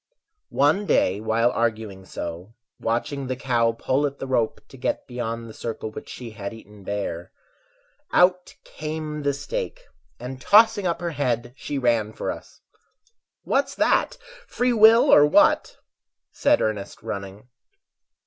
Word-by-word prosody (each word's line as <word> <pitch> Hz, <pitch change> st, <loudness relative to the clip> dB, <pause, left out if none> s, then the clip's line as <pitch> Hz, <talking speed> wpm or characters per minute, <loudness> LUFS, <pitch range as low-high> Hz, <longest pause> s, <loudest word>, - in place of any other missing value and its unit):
One 155 Hz, +9 st, +3 dB
day 95 Hz, +2 st, +2 dB
while 115 Hz, +2 st, +2 dB
arguing 110 Hz, -5 st, -2 dB
so, 90 Hz, +5 st, -7 dB, 0.2 s
watching 120 Hz, +4 st, -2 dB
the 130 Hz, -, -2 dB
cow 120 Hz, -3 st, +1 dB
Pull 130 Hz, +5 st, 0 dB
at 140 Hz, 0 st, -8 dB
the -, -, -5 dB
rope 125 Hz, -4 st, 0 dB
to -, -, -13 dB
get 130 Hz, -, -2 dB
beyond 115 Hz, -2 st, -5 dB
the 110 Hz, -, -10 dB
circle 110 Hz, -1 st, -5 dB
Which -, -, -9 dB
she 120 Hz, -2 st, -8 dB
had 100 Hz, 0 st, -6 dB
eaten 105 Hz, -2 st, -15 dB
bare, 95 Hz, -4 st, -4 dB, 0.8 s
Out 180 Hz, 0 st, +3 dB
came 155 Hz, -1 st, -5 dB
the 145 Hz, 0 st, +1 dB
stake, -, -, -5 dB, 0.4 s
and 130 Hz, +2 st, -7 dB
tossing 205 Hz, -, +5 dB
up 170 Hz, 0 st, -2 dB
her 170 Hz, -1 st, -2 dB
head, 120 Hz, -5 st, -2 dB
She 145 Hz, -, -5 dB
ran 115 Hz, -4 st, +1 dB
for -, -, -3 dB
us. -, -, -11 dB, 0.8 s
"What's 275 Hz, 0 st, 0 dB
that, 315 Hz, -, +2 dB, 0.3 s
free 245 Hz, 0 st, 0 dB
will 225 Hz, +2 st, +7 dB
or 145 Hz, -, +8 dB
what?" 150 Hz, -, +3 dB, 0.5 s
said -, -, +2 dB
Ernest, 105 Hz, -2 st, -4 dB
running. 100 Hz, +2 st, -6 dB
125 Hz, 145 wpm, -24 LUFS, 110-150 Hz, 0.8 s, or